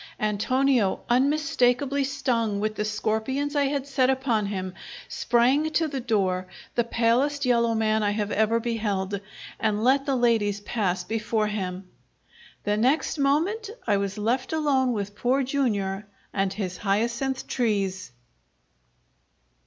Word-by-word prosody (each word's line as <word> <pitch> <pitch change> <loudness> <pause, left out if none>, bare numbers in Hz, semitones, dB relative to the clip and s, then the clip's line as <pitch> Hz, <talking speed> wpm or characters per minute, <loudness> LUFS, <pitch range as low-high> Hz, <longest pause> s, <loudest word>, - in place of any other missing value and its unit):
Antonio, 220 +1 +1
unmistakably 275 0 +2
stung 240 -7 -1
with 215 +1 -1
the 210 - -2
scorpions 220 +7 -1
I 285 -1 +3
had 275 -1 -1
set 270 -2 +2
upon 250 -6 +1
him, 185 -2 -4 0.3
sprang 260 +6 +2
to 320 +1 +1
the 275 -3 -4
door, 190 -6 0 0.3
the 240 - +2
palest 245 +5 +1
yellow 235 -2 +3
man 220 0 +2
I 205 - +2
have 205 0 -2
ever 220 +2 +2
beheld, 205 -4 -2 0.4
and 215 -1 0
let 270 +3 +3
the 275 - +2
ladies 225 -5 +2
pass 190 -4 -1
before 220 +1 -1
him. 190 -3 -4 0.8
The 205 0 0
next 270 +7 +1
moment 340 +11 +1 0.2
I 205 -3 +2
was 200 +1 -2
left 245 +7 -1
alone 275 -5 +2
with 205 -2 -3
Poor 255 +5 +1
Jr. 210 -7 -1 0.3
and 195 -1 0
his 190 -3 -4
hyacinth 235 +6 -1
trees. 195 - -1
230 Hz, 135 wpm, -25 LUFS, 205-270 Hz, 0.8 s, I